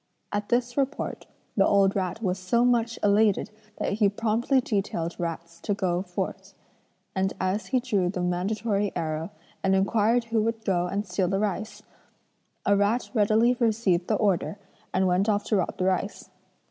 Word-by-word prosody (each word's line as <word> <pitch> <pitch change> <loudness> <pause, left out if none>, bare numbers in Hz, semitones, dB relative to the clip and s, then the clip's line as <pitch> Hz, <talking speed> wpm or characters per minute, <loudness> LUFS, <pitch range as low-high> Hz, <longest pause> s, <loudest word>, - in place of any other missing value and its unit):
At 205 0 -2
this 240 +1 0
report 275 +1 -2 0.3
the 195 - +4
old 200 -1 +4
rat 195 +3 -2
was 185 -1 0
so 235 +7 +2
much 235 -2 +2
elated 205 0 +3 0.3
that - - -1
he 205 -1 +3
promptly 230 +6 +1
detailed 195 -7 -2
rats 170 0 -5
to 205 - -1
go 180 -3 0
forth; 180 -2 -5 0.6
and 190 0 0
as 185 +1 -1
he 255 +3 +2
drew 205 -8 0
the 180 -1 -3
mandatory 200 +3 0
arrow, 160 +1 -2 0.3
and 190 0 +3
inquired 220 +4 +2
who 230 -1 0
would 225 0 -2
go 180 -3 +1
and 200 +3 -2
steal 180 0 0
the 195 +2 0
rice, 210 +1 -3 0.8
a 200 - +4
rat 205 +5 +1
readily 220 +2 +4
received 210 -7 +1
the 215 - +2
order 200 -1 0 0.3
and 190 +1 +2
went 185 +3 +2
off 205 -1 +1
to 215 - 0
rob 185 - -1
the 185 - 0
rice. 190 +2 -2
200 Hz, 170 wpm, -26 LUFS, 185-225 Hz, 0.8 s, the